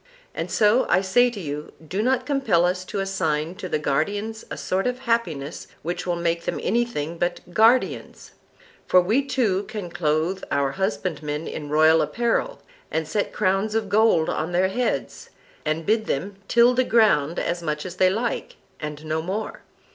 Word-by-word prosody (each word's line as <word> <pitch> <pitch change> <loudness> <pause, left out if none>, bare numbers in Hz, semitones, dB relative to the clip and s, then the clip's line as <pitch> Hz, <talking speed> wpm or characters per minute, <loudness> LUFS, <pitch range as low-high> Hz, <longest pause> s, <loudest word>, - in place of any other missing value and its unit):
And - - -4
so 215 +4 +3
I 185 - +4
say 245 +6 +4
to 235 -4 -7
you, 150 -3 -6
do 190 +6 -1
not 255 +2 +1
compel 240 -12 +2
us 180 +1 0
to 195 +1 -3
assign 165 -4 -1
to 185 - -6
the - - +1
guardians 205 +10 -1
a - - -5
sort 190 +5 -1
of 250 +1 -3
happiness 175 - -2 0.2
which 175 +2 -3
will 175 - +1
make 170 0 -1
them - - -2
anything 185 -8 -1
but 175 0 -3
guardians; 225 +6 +2 0.6
for 185 - +6
we 210 +10 +2
too 250 -8 +1
can 195 -5 -6
clothe 160 +4 0
our 140 -1 +1
husbandmen 150 -3 -2
in 150 -2 -6
royal 155 +2 +5
apparel, 240 - -1 0.3
and 160 -1 -2
set 205 +5 -1
crowns 195 +3 0
of 220 -3 -1
gold 205 -6 +4
on 165 +3 -2
their 185 +2 +3
heads, 245 +5 -2 0.4
and 155 +1 -1
bid 220 +1 +1
them 190 +8 -2
till 235 +1 +5
the 255 +1 +3
ground 195 - +3
as 170 0 -1
much 150 -1 -3
as 185 0 -7
they 185 0 +5
like, 240 - -2 0.2
and 150 0 -6
no 155 +1 -1
more. 195 +6 -4
185 Hz, 175 wpm, -24 LUFS, 160-225 Hz, 0.6 s, for